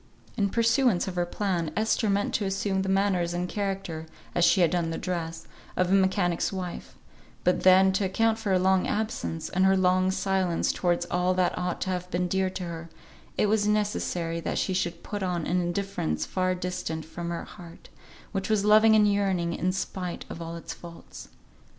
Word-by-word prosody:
In 205 -4 +1
pursuance 230 -3 +2
of 190 - -3
her 175 -1 -1
plan, 175 -5 -1
Esther 220 0 +1
meant 200 +1 0
to 210 - 0
assume 195 0 0
the 190 - -2
manners 190 -3 +1
and 180 +1 -1
character, 190 -5 -3 0.3
as 175 - +2
she 185 - +5
had 170 - +4
done 170 -2 0
the 165 - -3
dress, 165 -2 -4 0.3
of 185 0 +2
a - - +4
mechanic's 190 -3 +2
wife; 185 -2 -6 0.5
but 180 - +2
then, 190 +1 +6
to 195 +1 +1
account 225 +4 +1
for 215 - -3
her 190 - +4
long 190 0 +2
absence, 85 - -2
and 185 - +1
her 190 0 +4
long 185 0 +3
silence 190 -2 0
towards 175 -1 0
all 180 +1 +1
that 180 -1 +1
ought 180 -1 -3
to 190 - -1
have 180 0 -3
been 180 0 0
dear 190 +1 +1
to 185 0 -6
her, 170 -1 -6 0.5
it - - +3
was 210 0 +2
necessary 190 -5 -1
that - - -3
she 190 - 0
should 175 -2 -2
put 205 -1 -5
on 180 -3 -1
an 180 +1 +1
indifference 175 - -2
far 185 0 0
distant 180 -3 -4
from 170 +2 -6
her 170 - -3
heart, 170 -1 -13 0.4
which 195 -1 -3
was 210 -2 +2
loving 215 +1 +6
and 210 -1 +5
yearning, 190 -4 0
in 180 +2 0
spite 185 -2 -4
of 170 - -7
all 165 0 -5
its 170 - -7
faults. 170 -1 -11
185 Hz, 195 wpm, -27 LUFS, 175-195 Hz, 0.5 s, then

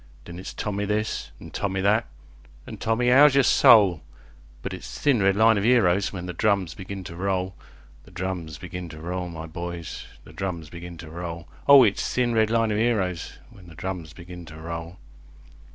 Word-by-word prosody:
Then 85 +1 -9
it's 95 - -7
Tommy 105 -1 -2
this, 105 +1 -2
an' 80 - -11
Tommy 95 +2 -2
that, 105 +4 +2 0.6
an' - - -8
"Tommy, 120 +2 +1
'ow's 140 +2 +7
yer 140 - +5
soul?" 105 - +6 0.6
But - - -4
it's - - -8
"Thin 135 -7 +3
red 95 0 +3
line 110 0 +5
of - - -2
'eroes" 100 -6 +3
when 90 -2 -6
the 90 - -5
drums 100 -3 +1
begin 95 0 -7
to 85 -1 -9
roll, 95 0 -1 0.5
The - - -16
drums 90 -5 -5
begin 90 +1 -7
to 80 - -10
roll, 90 +2 -4
my 80 -1 -7
boys, 85 +1 -7 0.2
the - - -15
drums 85 -5 -5
begin 85 0 -9
to 80 -1 -10
roll, 85 0 -6 0.2
O 140 -2 +9
it's 105 -4 +1
"Thin 125 -1 +1
red 110 -1 +3
line 115 -1 +2
of 105 - 0
'eroes" 95 -7 0 0.2
when 90 -3 -15
the 85 - -13
drums 85 -3 -5
begin 90 +1 -10
to 80 -1 -11
roll. 85 +2 -7
95 Hz, 190 wpm, -25 LUFS, 85-110 Hz, 0.6 s, O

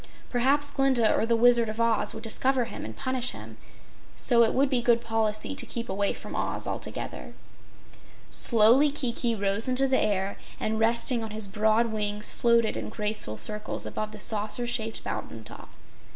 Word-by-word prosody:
Perhaps 280 +4 +2
Glinda 265 -5 +3
or 225 - 0
the 230 - +2
Wizard 235 -1 +4
of 215 +1 -6
Oz 230 -1 +2
would - - -8
discover 255 +2 0
him - - -8
and - - -8
punish 260 -2 -2
him, - - -11 0.6
so 235 -2 +3
it 225 - +4
would 275 +2 +3
be 260 -3 +1
good 235 -1 +3
policy 225 0 -2
to - - 0
keep 235 -2 -5
away 200 +1 0
from - - -8
Oz - - -1
altogether. - - -6 1.0
Slowly 235 +6 +5
Kiki 240 -4 -1
rose 200 +2 -1
into 255 +1 +2
the 260 0 +2
air, 200 -2 -1 0.2
and 220 0 -2
resting 230 +1 +2
on 220 - -5
his 215 0 -2
broad 220 +3 +1
wings, 210 0 -1
floated 235 -2 +2
in - - -5
graceful 210 - -2
circles 210 - -2
above 215 0 -5
the 215 - -10
saucer 215 +3 +1
shaped 225 -2 -3
mountain 115 - -6
top. - - -10
230 Hz, 175 wpm, -26 LUFS, 215-245 Hz, 1.0 s, Slowly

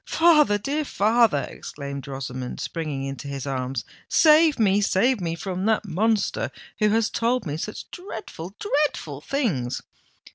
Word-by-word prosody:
"Father—dear 300 -4 +3
father!" 220 - +3
exclaimed 140 -2 -7
Rosamond, 130 -2 -5
springing 155 -5 -3
into 135 0 -5
his 140 -1 -5
arms; 130 -3 -3 0.2
"save 310 -1 +6
me—save 205 +2 +3
me 165 -1 -2
from 185 +2 -4
that 220 0 +2
monster, 210 +4 0 0.3
who 215 -1 +4
has 220 +1 +2
told 235 -1 0
me 145 -2 -3
such 210 +7 -5
dreadful—dreadful 220 - -3
things!" 150 - -1
195 Hz, 120 wpm, -24 LUFS, 140-235 Hz, 0.3 s, save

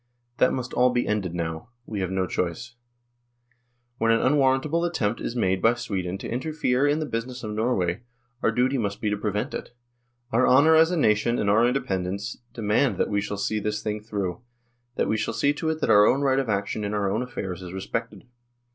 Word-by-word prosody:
That - - +4
must 125 -1 -4
all 125 +1 +4
be 120 -1 0
ended 95 -5 -1
now 80 +2 -4 0.2
we 105 - -5
have 95 -2 -1
no 95 0 0
choice. 90 +6 -3 1.3
When 115 - +2
an 115 - +4
unwarrantable 140 +4 +2
attempt 115 -11 -1
is 115 - -4
made 95 -5 +1
by 115 +2 +4
Sweden 95 -5 -3
to - - -7
interfere 135 0 0
in 145 +1 +2
the 155 - -2
business 125 0 -4
of 110 - -4
Norway, 105 -4 0 0.4
our - - +3
duty 130 +2 +1
must 100 -3 -2
be 105 - -1
to - - +1
prevent 105 +6 -2
it; 120 - -7 0.6
our 120 +3 +3
honour 150 +5 +6
as 160 +1 +6
a 180 - -1
nation 115 -2 +2
and 100 - +1
our 115 +3 +4
independence 100 -6 -2
demand 115 +3 +1
that - - 0
we 100 0 +1
shall 100 0 -4
see 105 +2 -1
this 105 +1 -3
thing 105 0 -3
through, 100 -4 -4 0.5
that - - 0
we 110 - +1
shall 110 - -2
see 145 0 +2
to 160 +2 -2
it 160 0 -2
that - - +2
our 105 0 +7
own 135 - +3
right 135 -1 +2
of 135 -4 -2
action 100 +1 -1
in 105 +1 -2
our 100 -2 0
own 110 +4 0
affairs 95 -8 -5
is 90 -1 -8
respected. 95 +1 -4
110 Hz, 210 wpm, -25 LUFS, 100-130 Hz, 1.3 s, our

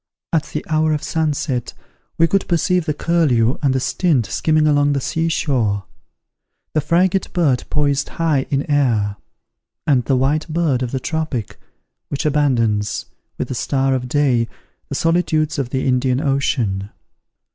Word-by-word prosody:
At 160 -1 +2
the - - -5
hour 155 -1 +2
of 150 - -2
sunset 150 -5 -1 0.4
we 165 - +5
could 195 +3 +1
perceive 180 0 +1
the 150 - +1
curlew 140 -9 +2
and 140 -3 +2
the - - +2
stint 140 -3 +1
skimming 155 +5 +1
along 145 -1 +3
the 140 - 0
seashore; 135 - 0 0.9
the 155 - +2
frigate 180 +5 +1
bird 150 -9 +1
poised 145 -1 0
high 155 -5 0
in 140 0 -1
air; 115 -9 +1 0.7
and 135 -5 +3
the 135 - +2
white 145 +5 +1
bird 155 -5 0
of 125 - -1
the 130 - -1
tropic, 155 -7 -3 0.5
which 140 +3 -3
abandons, 120 -8 +1 0.3
with - - -3
the - - -2
star 135 +1 0
of 125 -1 -2
day, 130 -5 +2 0.4
the 140 - -3
solitudes 160 -2 +1
of 130 -3 -2
the 130 +1 -2
Indian 125 0 +2
ocean. 125 -9 0
145 Hz, 150 wpm, -19 LUFS, 125-155 Hz, 0.9 s, we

